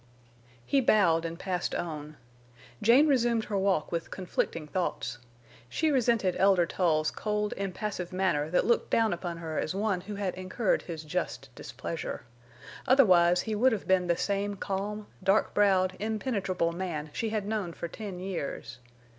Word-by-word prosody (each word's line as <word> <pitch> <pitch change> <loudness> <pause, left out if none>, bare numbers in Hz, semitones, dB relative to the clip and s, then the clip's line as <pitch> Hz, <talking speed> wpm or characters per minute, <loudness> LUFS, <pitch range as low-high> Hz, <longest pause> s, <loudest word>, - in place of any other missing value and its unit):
He 275 - +3
bowed 170 -9 +4
and 165 0 -4
passed 180 -1 -2
on. 155 -2 -5 0.6
Jane 250 +7 +6
resumed 240 -5 +2
her 205 -2 -2
walk 190 -5 +1
with 170 -1 -3
conflicting 170 -3 -2
thoughts. 150 -7 -3 0.5
She 315 - +1
resented 235 -8 +2
Elder 190 -3 +5
Tull's 155 -3 +1
cold, 210 -1 -2
impassive 195 -1 -4
manner 185 -5 0
that 180 - +2
looked 235 - +2
down 225 -3 +3
upon 175 -1 -4
her 160 -2 -3
as 160 - -2
one 200 -2 0
who 205 +3 -7
had 200 -2 -2
incurred 185 +3 0
his 165 -3 -7
just 150 -5 -4
displeasure. 140 +8 -6 0.6
Otherwise 180 -10 +5
he 220 - -3
would 245 +4 +4
have 210 - -4
been 185 -1 +3
the 170 -1 +2
same 200 +1 -1
calm, 200 +2 -3 0.2
dark 195 +3 +3
browed, 190 -2 +3
impenetrable 205 -6 -1
man 170 -4 -4
she 225 - -2
had 215 -2 -2
known 210 -4 -2
for 170 - -5
ten 195 0 -7
years. 170 -9 -5
190 Hz, 155 wpm, -29 LUFS, 170-210 Hz, 0.6 s, Jane